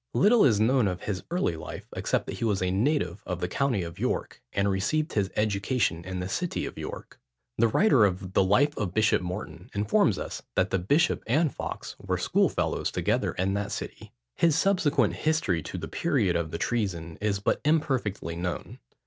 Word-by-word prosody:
Little 215 +3 +5
is 110 -6 +4
known 120 +1 +3
of 90 -2 -3
his 95 -3 -3
early 170 - 0
life, 80 - -8
except - - 0
that - - -6
he - - -3
was 105 -4 +1
a 90 - +1
native 105 - 0
of 90 -2 -3
the 90 - -1
county 125 -2 0
of 85 -1 -8
York, - - -2
and 100 0 +1
received 105 +11 0
his 100 -3 +1
education 105 -3 0
in 95 0 -4
the 90 - -3
city 175 - -2
of - - -6
York. - - -8 0.4
The 115 - +5
writer 135 - +4
of 95 -1 -2
the - - +4
Life 135 +10 +3
of 95 -4 -3
Bishop 110 -3 +3
Morton 90 -2 -6
informs 105 +1 +2
us - - -5
that 95 - +1
the 95 - +2
bishop 145 - +2
and 145 +5 +2
Fawkes - - -6
were - - -2
schoolfellows - - +1
together - - 0
in 95 +2 0
that 100 0 -2
city. - - -6 0.2
His 165 -3 +3
subsequent 180 -5 +2
history 155 - +1
to 90 - -6
the 80 -2 -5
period 110 - +1
of 85 -1 -1
the - - -4
treason, 90 -9 -2
is 105 -2 +1
but 100 - 0
imperfectly 130 - 0
known. 90 +1 -4
100 Hz, 190 wpm, -27 LUFS, 90-135 Hz, 0.4 s, Little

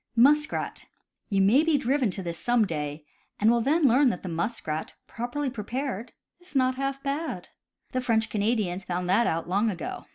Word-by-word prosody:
Muskrat. 295 +6 +2 0.2
— - - -44
You 195 -1 +2
may 225 +10 +5
be 325 -2 +3
driven 265 -2 +1
to 190 +1 -5
this, 170 -1 -4
some 240 -2 +3
day, 150 -3 -4 0.3
and 215 +2 +5
will 235 0 +2
then 300 +7 +2
learn 265 +1 +5
that 190 -4 -4
muskrat, 165 -2 -3
properly 250 +4 -3
prepared, 240 +1 -4 0.3
is 355 -4 -15
not 260 -1 +3
half 275 +1 -3
bad. 290 +4 -3 0.4
The 255 - -1
French 225 -3 +1
Canadians 205 -4 0
found 180 0 -3
that 230 +6 +4
out 165 +1 -1
long 200 +5 +2
ago. 180 -5 -5
235 Hz, 180 wpm, -27 LUFS, 190-270 Hz, 0.4 s, may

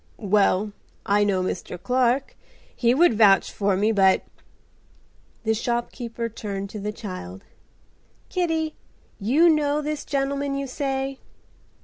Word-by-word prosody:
"Well, 205 0 +2 0.3
I 205 +1 +3
know 195 -3 +1
Mr. 180 -1 -4
Clark. 250 +6 +1 0.4
He 240 0 +2
would 340 -2 +5
vouch 205 -3 +5
for 200 -2 0
me, 210 +3 +2
but—." 195 -3 +4 1.2
The 220 0 +2
shopkeeper 235 0 -3
turned 200 -3 -5
to 215 - -6
the 210 +1 -3
child. 185 - -8 0.8
"Kitty, 325 -4 -1 0.5
you 270 - +4
know 300 -2 +3
this 300 0 -3
gentleman, 280 0 -1
you 275 0 -2
say?" 270 0 -3
235 Hz, 120 wpm, -24 LUFS, 200-275 Hz, 1.2 s, would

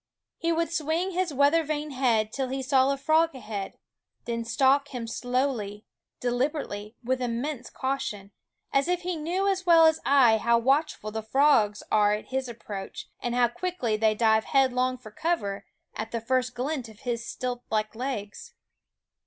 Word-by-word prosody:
He 335 - 0
would 335 0 0
swing 330 +4 0
his 365 -2 -1
weather 285 +4 +3
vane 300 0 -3
head 235 -5 +1
till 270 -2 -1
he 265 +1 -3
saw 265 0 +3
a 275 - -1
frog 315 +2 +2
ahead, 210 -5 -6 0.5
then 230 -1 -2
stalk 270 +4 +3
him 250 -4 -5
slowly, 240 -4 -2 0.3
deliberately, 245 -4 -2
with 255 +2 -1
immense 245 +2 -3
caution; 215 -7 -3 0.4
as 275 +2 +3
if 360 0 0
he 360 0 -2
knew 350 +5 -1
as 380 -2 0
well 330 -1 +7
as 320 0 +4
I 255 -6 +5
how 235 +2 +3
watchful 265 -3 +1
the 220 +1 -3
frogs 220 -3 +3
are 210 -1 +4
at 210 - -5
his 260 -1 -2
approach, 205 -4 -7
and 240 0 -2
how 245 -1 +4
quickly 260 -7 -2
they 215 0 +2
dive 220 0 +3
headlong 255 -1 +2
for 230 -4 -12
cover 210 -8 -2 0.3
at 220 +1 -5
the 230 - -2
first 250 +2 0
glint 255 -1 -3
of 215 -1 -16
his 235 -2 -2
stilt 245 +1 -4
like 215 -1 -1
legs. 225 -4 -5
255 Hz, 170 wpm, -27 LUFS, 225-295 Hz, 0.5 s, well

